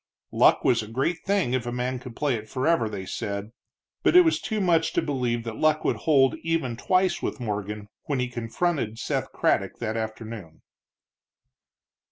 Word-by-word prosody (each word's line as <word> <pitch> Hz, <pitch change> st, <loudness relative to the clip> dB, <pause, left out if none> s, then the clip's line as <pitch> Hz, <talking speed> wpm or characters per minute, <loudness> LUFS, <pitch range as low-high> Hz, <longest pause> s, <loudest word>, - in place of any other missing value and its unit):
Luck -, -, +4 dB
was 120 Hz, -3 st, +3 dB
a 110 Hz, -, -7 dB
great 135 Hz, +10 st, -1 dB
thing 195 Hz, -11 st, +1 dB
if 125 Hz, -2 st, -1 dB
a -, -, -2 dB
man 125 Hz, +1 st, -2 dB
could 125 Hz, -2 st, -10 dB
play 145 Hz, -3 st, 0 dB
it 110 Hz, -2 st, -5 dB
forever, 130 Hz, -2 st, +1 dB
they 100 Hz, -3 st, -5 dB
said, 100 Hz, +2 st, -4 dB, 0.5 s
but -, -, +3 dB
it 360 Hz, -, +11 dB
was 325 Hz, -2 st, +2 dB
too 220 Hz, -1 st, -2 dB
much 170 Hz, -4 st, +2 dB
to -, -, +2 dB
believe 125 Hz, -5 st, -1 dB
that 115 Hz, -1 st, -6 dB
luck 155 Hz, 0 st, +2 dB
would -, -, +2 dB
hold 135 Hz, -4 st, +3 dB
even 165 Hz, -7 st, -1 dB
twice 185 Hz, +9 st, +1 dB
with -, -, -3 dB
Morgan 105 Hz, -2 st, -4 dB, 0.2 s
when 140 Hz, -3 st, -1 dB
he 125 Hz, -, 0 dB
confronted 120 Hz, +1 st, -2 dB
Seth -, -, -2 dB
Craddock -, -, 0 dB
that 110 Hz, -, -3 dB
afternoon. 110 Hz, -6 st, -6 dB
125 Hz, 180 wpm, -26 LUFS, 110-155 Hz, 0.5 s, it